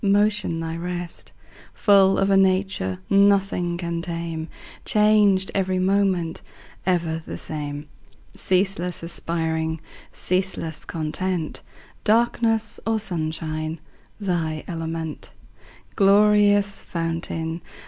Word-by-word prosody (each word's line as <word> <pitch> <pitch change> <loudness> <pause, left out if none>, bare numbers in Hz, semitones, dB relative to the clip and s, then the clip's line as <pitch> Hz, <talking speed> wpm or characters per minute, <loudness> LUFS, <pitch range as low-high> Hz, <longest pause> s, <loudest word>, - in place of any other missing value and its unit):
Motion 205 -3 +2
thy 165 0 -4
rest; 175 0 -5 0.4
Full 195 -2 +5
of 195 0 +2
a - - +5
nature 190 - +2
Nothing 195 -3 +3
can 170 -1 -3
tame, 165 -2 -4 0.4
Changed 210 -3 +3
every 190 -1 0
moment, 185 -3 +1 0.5
Ever 165 -3 0
the - - -5
same; 145 -1 -5 0.5
Ceaseless 185 -2 0
aspiring, 160 -1 -1 0.3
Ceaseless 185 -4 -1
content, 165 +1 -3 0.4
Darkness 225 -1 +2
or 225 0 +1
sunshine 160 -4 -3 0.4
Thy 165 -6 -2
element; 165 -2 -5 0.6
Glorious 205 0 +4
fountain. 165 0 -3
180 Hz, 90 wpm, -23 LUFS, 165-200 Hz, 0.6 s, Full